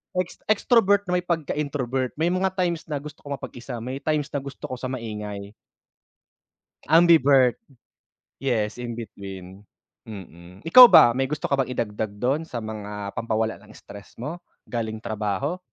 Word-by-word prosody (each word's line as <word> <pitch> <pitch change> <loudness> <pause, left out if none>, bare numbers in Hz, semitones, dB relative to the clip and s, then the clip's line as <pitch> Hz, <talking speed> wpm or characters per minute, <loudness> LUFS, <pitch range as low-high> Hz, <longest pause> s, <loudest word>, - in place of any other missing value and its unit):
ex 180 -1 -2
extrovert 205 -2 +3
na 180 - +2
may 180 - -9
pagka-introvert. 145 -6 -2
May 165 +3 +1
mga 190 +1 0
times 175 -3 -1
na 145 -3 -3
gusto 150 0 -10
kong 145 -1 -5
mapag-isa, 120 -2 -8
may 130 +3 -5
times 150 -1 -1
na 145 - -1
gusto 140 -1 -10
ko 130 - -4
sa 130 - -4
maingay. 105 -5 -6 1.4
Ambivert. 145 -7 +6 0.9
Yes, 115 -4 -1
in 120 -1 -5
between, 100 -3 -9 0.4
mm. 90 -2 -11
Ikaw 250 +10 +10
ba, 120 - +8
may 135 +3 -1
gusto 150 +1 -4
ka 140 - +2
bang 130 -1 -1
idagdag 110 -1 -2
do'n 135 +9 -1
sa 120 -6 -5
mga 105 -2 -6
pampawala 110 -1 -2
ng 105 - -17
stress 100 0 -13
mo 150 +9 -6 0.2
galing 110 -2 -4
trabaho? 110 - -2
130 Hz, 155 wpm, -24 LUFS, 110-155 Hz, 1.4 s, Ikaw